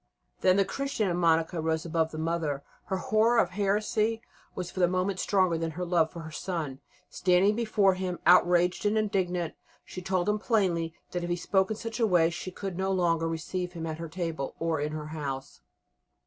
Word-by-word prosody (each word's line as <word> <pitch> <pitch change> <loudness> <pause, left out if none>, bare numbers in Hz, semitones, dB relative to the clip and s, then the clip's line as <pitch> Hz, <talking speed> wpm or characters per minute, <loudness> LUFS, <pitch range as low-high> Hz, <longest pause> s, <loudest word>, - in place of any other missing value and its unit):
Then 185 +1 +4
the 200 - +4
Christian 230 -4 -1
in 175 - -1
Monica 165 -1 +2
rose 160 0 -1
above 165 -1 0
the 155 - -8
mother; 160 -3 -1 0.2
her 190 - -2
horror 220 +5 +2
of 185 -6 +3
heresy 210 +3 0 0.3
was 180 -1 -4
for - - -7
the 175 - +5
moment 185 +1 -1
stronger 185 -4 +2
than 165 0 -1
her 180 - -2
love 170 -2 +2
for 170 - -8
her 160 -1 -8
son. 155 -3 -4 0.3
Standing 185 +3 +3
before 215 -4 +3
him, 185 -1 -3
outraged 180 0 +5
and 210 +1 +1
indignant, 180 -5 0 0.3
she 185 - -7
told 185 0 0
him 210 0 +1
plainly 175 -8 +1 0.2
that 175 -1 -3
if 175 - -3
he 175 - +1
spoke 190 +2 +1
in 220 - -2
such 230 +1 -5
a 225 - +3
way 170 -4 +4
she 175 +2 -5
could 185 0 -6
no 190 0 0
longer 170 -3 +1
receive 180 +2 -3
him 165 -2 -5
at 160 0 -4
her 165 -1 -5
table 165 -5 -4
or 165 -2 -1
in 150 +1 -1
her 155 -1 -5
house. 140 -4 -5
180 Hz, 205 wpm, -28 LUFS, 165-195 Hz, 0.3 s, the